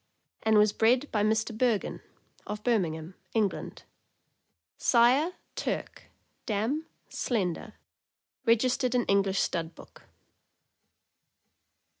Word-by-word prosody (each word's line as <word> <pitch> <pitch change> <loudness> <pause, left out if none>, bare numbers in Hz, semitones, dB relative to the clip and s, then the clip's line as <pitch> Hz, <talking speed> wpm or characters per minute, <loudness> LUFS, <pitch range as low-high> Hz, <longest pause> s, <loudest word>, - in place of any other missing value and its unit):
and 220 -1 +3
was 210 0 +5
bred 245 +5 +3
by 210 - +1
Mr. 220 +1 +1
Bergon, 230 -3 0 0.5
of 210 0 -5
Birmingham, 170 -8 0 0.2
England; 210 -4 -1 1.0
sire, 255 +9 +4 0.2
Turk; - - -4 0.4
dam, 235 +9 -1 0.2
Slendor; 210 -2 -2 0.7
reg 230 -2 +4
istered 255 -1 +1
in 245 - +2
English 195 -1 +2
Stud 165 -1 -1
Book. - - -15
220 Hz, 95 wpm, -29 LUFS, 200-245 Hz, 1.0 s, was